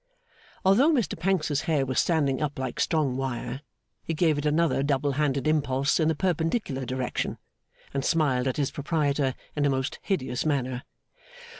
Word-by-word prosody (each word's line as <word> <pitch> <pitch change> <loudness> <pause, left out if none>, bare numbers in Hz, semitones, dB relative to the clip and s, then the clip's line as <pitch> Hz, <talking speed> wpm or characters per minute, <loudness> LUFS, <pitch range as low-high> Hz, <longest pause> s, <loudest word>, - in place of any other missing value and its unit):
Although 235 +12 +5
Mr 255 -9 +1
Pancks's 165 -6 0
hair 145 -4 +2
was 130 0 0
standing 145 -6 +1
up 145 -1 -2
like 130 -2 -4
strong 150 -6 +1
wire, 135 0 -3 0.4
he 165 - -3
gave 155 -2 +2
it 150 - -1
another 155 -1 +2
double 140 0 +1
handed 140 -2 0
impulse 140 -2 +2
in 160 - +3
the 160 - +2
perpendicular 165 - -1
direction, 130 0 -2 0.6
and 135 -1 -1
smiled 135 -6 +2
at 130 - -1
his 140 -3 0
proprietor 145 -3 0 0.2
in 145 - 0
a 145 - +3
most 130 -1 -2
hideous 130 -10 -1
manner. 130 -4 -1
145 Hz, 160 wpm, -27 LUFS, 130-160 Hz, 0.6 s, Although